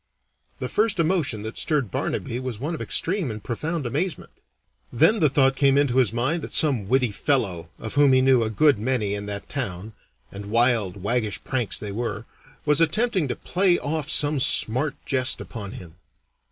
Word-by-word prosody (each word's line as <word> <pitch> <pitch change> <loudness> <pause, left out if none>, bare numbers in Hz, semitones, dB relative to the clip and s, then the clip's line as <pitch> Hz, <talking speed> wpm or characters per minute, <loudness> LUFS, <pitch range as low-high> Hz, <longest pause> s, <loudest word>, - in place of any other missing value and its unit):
The - - -4
first 215 -4 0
emotion 155 - 0
that 110 +1 -5
stirred 140 - 0
Barnaby 120 - -3
was 130 -4 -5
one 150 +7 -3
of 160 - -5
extreme 185 -4 -1
and 110 -2 -7
profound 155 +5 -3
amazement. 155 +9 -3 0.6
Then 165 - +4
the 155 - +4
thought 135 0 +3
came 140 0 +3
into 140 -3 +2
his 125 -5 +3
mind 130 +9 -1
that - - -7
some 130 -11 +2
witty 130 -3 +2
fellow, 100 - -1
of 110 - -7
whom 145 -1 +5
he 130 - +5
knew 130 -2 +4
a 110 - 0
good 140 +2 +3
many 110 -3 -1
in 100 0 -4
that 100 -1 -5
town 110 -6 -5 0.4
and 100 +1 -8
wild, 110 -4 +1
waggish 105 -5 -1
pranks 125 -5 -2
they 105 - -6
were 115 +3 -4 0.4
was 150 +1 +3
attempting 185 0 +1
to 125 - -3
play 180 -1 +1
off 150 0 -3
some 145 -1 +2
smart 130 +3 +1
jest 130 -2 +1
upon 100 -3 -7
him. 85 -3 -11
130 Hz, 180 wpm, -24 LUFS, 110-150 Hz, 0.6 s, whom